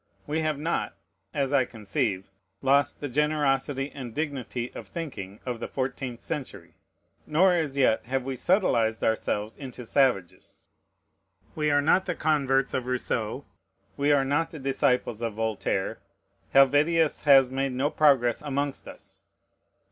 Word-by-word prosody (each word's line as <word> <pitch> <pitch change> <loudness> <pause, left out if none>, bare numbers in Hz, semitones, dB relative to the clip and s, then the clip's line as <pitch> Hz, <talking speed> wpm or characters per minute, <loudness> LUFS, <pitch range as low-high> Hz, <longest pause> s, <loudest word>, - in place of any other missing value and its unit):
We 150 +2 -1
have 155 -2 0
not 165 +4 -2 0.4
(as 140 +1 -1
I 135 -2 +5
conceive) 100 -4 -3 0.3
lost 140 +1 +2
the 145 - -2
generosity 145 -1 0
and 125 -5 -8
dignity 130 -5 -3
of - - -8
thinking 110 - -7
of 125 -2 -3
the - - -4
fourteenth 130 -2 -4
century; 125 - -6 0.5
nor 180 +5 +4
as 155 -5 -1
yet 125 -4 +2
have 130 0 -1
we 135 -1 -3
subtilized 120 - +1
ourselves 110 -1 -1
into 125 -3 -9
savages. 120 -9 0 0.9
We 150 -1 0
are 145 0 +3
not 185 +5 +3
the 180 - -1
converts 135 -4 +1
of 125 -1 -2
Rousseau; 125 -1 -2 0.5
we 145 +1 +2
are 140 -2 +3
not 145 +4 0
the 160 - -9
disciples 130 -4 0
of 115 -3 -3
Voltaire; 110 -3 -2 0.5
Helvetius 145 +4 +4
has 135 -3 +6
made 135 0 -1
no 135 +4 0
progress 130 -6 +3
amongst 140 -1 -3
us. - - -14
135 Hz, 140 wpm, -27 LUFS, 120-150 Hz, 0.9 s, has